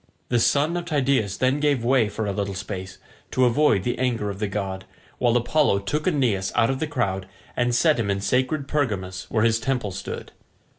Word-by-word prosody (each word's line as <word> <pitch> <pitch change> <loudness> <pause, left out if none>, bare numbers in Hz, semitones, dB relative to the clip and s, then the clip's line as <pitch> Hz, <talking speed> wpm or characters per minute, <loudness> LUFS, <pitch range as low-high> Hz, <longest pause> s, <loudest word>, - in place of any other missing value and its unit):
The 120 - +2
son 145 +7 +2
of 175 - -4
Tydeus 135 - +1
then 130 +3 +1
gave 145 -5 +1
way 120 -4 +3
for 110 +1 -3
a 100 - -1
little 100 0 -3
space, 95 -1 -6 0.3
to 130 - +2
avoid 125 -5 +3
the 120 - -2
anger 120 -5 0
of 100 - -8
the 105 - -1
god, 95 -2 -4 0.3
while 120 -1 +3
Apollo 120 -1 +2
took 150 - -2
Aeneas 120 - +1
out 115 - +3
of 130 - -3
the 155 - -1
crowd 95 -10 -2 0.3
and 120 0 +1
set 155 +2 +3
him 105 -3 -1
in 100 0 0
sacred 130 +7 0
Pergamus, 105 -12 -2
where 110 -1 +1
his 115 -1 +3
temple 120 -4 -1
stood. 95 +1 -6
120 Hz, 200 wpm, -24 LUFS, 100-135 Hz, 0.3 s, way